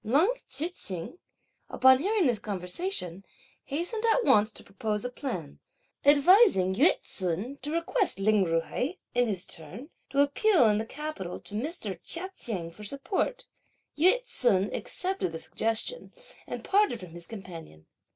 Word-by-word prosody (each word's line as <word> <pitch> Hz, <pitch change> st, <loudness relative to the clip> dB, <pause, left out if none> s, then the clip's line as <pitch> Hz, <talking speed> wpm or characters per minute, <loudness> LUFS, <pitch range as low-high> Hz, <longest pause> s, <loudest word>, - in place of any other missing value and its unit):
Leng 295 Hz, -, +3 dB
Tzu 295 Hz, +6 st, +1 dB
hsing, 200 Hz, -, -4 dB, 0.5 s
upon 260 Hz, 0 st, +5 dB
hearing 400 Hz, +3 st, +1 dB
this 240 Hz, -5 st, +2 dB
conversation, 190 Hz, -, -3 dB, 0.4 s
hastened 350 Hz, +10 st, -3 dB
at 460 Hz, +1 st, +3 dB
once 215 Hz, +1 st, +4 dB
to -, -, -10 dB
propose 210 Hz, +3 st, -3 dB
a 250 Hz, -, -3 dB
plan, 185 Hz, -, -6 dB, 0.4 s
advising 285 Hz, -, +5 dB
Yü 275 Hz, -, +4 dB
ts'un 190 Hz, +9 st, -3 dB
to 290 Hz, +3 st, -4 dB
request 335 Hz, -, 0 dB
Lin 205 Hz, 0 st, +3 dB
Ju 165 Hz, -2 st, +1 dB
hai, 275 Hz, -, -3 dB, 0.2 s
in 245 Hz, 0 st, +2 dB
his 195 Hz, -3 st, -2 dB
turn, 190 Hz, -, -7 dB, 0.2 s
to 275 Hz, +1 st, +2 dB
appeal 285 Hz, -, +4 dB
in 210 Hz, 0 st, +2 dB
the 220 Hz, -, -4 dB
capital 295 Hz, -, -6 dB
to -, -, -11 dB
Mr. 220 Hz, -, -3 dB
Chia 370 Hz, +3 st, -3 dB
Cheng 180 Hz, -8 st, -4 dB
for 210 Hz, +5 st, -12 dB
support. 325 Hz, -, -2 dB, 0.5 s
Yü 370 Hz, +11 st, +5 dB
ts'un 210 Hz, -, +1 dB
accepted 370 Hz, -, -2 dB
the -, -, -3 dB
suggestion, 225 Hz, -, -1 dB, 0.4 s
and -, -, -6 dB
parted 400 Hz, -, +2 dB
from 180 Hz, -4 st, -10 dB
his 170 Hz, 0 st, -8 dB
companion. 165 Hz, -, -10 dB
245 Hz, 150 wpm, -28 LUFS, -, 0.5 s, upon